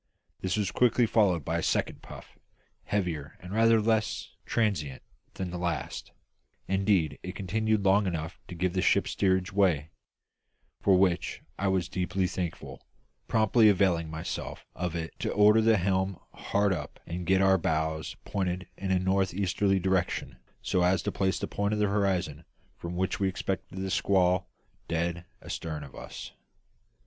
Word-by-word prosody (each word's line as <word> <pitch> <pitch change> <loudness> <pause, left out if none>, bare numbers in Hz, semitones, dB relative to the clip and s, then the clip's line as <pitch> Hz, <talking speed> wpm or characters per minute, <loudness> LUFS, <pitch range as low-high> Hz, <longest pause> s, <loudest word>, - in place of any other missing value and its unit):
This 95 +2 -1
was 100 -3 0
quickly 120 0 +3
followed 95 - +2
by - - 0
a - - -2
second - - 0
puff, - - -12 0.5
heavier 85 -8 -2
and 90 +2 -9
rather 115 +1 +5
less 110 0 0 0.2
transient 95 - -1 0.3
than 95 -2 -4
the 90 - -4
last; 85 -4 -3 0.6
indeed, 95 -4 +1
it 90 +1 -6
continued 110 +1 0
long 100 +1 +4
enough 80 -2 -4
to 90 - -8
give 90 +1 0
the 95 - +1
ship - - +3
steerage 95 -1 +1
way; 85 -6 +2 0.9
for 95 -2 +5
which 90 -2 +1 0.2
I 100 - +1
was 95 -2 +1
deeply 90 +1 -1
thankful, 90 -2 -4 0.5
promptly 110 0 +5
availing 90 -5 +2
myself 80 0 -5
of 90 -1 -3
it 80 -1 -4
to - - -1
order 105 +2 +6
the 110 0 +4
helm 95 0 0 0.2
hard 100 -1 +1
up 75 -5 -6
and 85 +2 -4
get 95 +2 +3
our 95 -1 +5
bows 80 -1 -1
pointed 95 -1 -2
in 95 - -4
a 95 - +3
north 95 0 +1
easterly 95 0 +1
direction, 90 -8 -1 0.3
so 90 - +1
as 90 +2 +3
to - - -1
place 95 -1 0
the - - -2
point 100 +1 -1
in - - -2
the 105 - +3
horizon 95 -6 0 0.3
from 85 +1 -6
which 95 +1 -1
we 100 - +2
expected 95 0 -4
the 95 0 -3
squall 90 -1 +2 0.4
dead 85 +1 -2 0.2
astern 80 -4 -5
of 70 - -11
us. - - -8
95 Hz, 160 wpm, -29 LUFS, 85-100 Hz, 0.9 s, order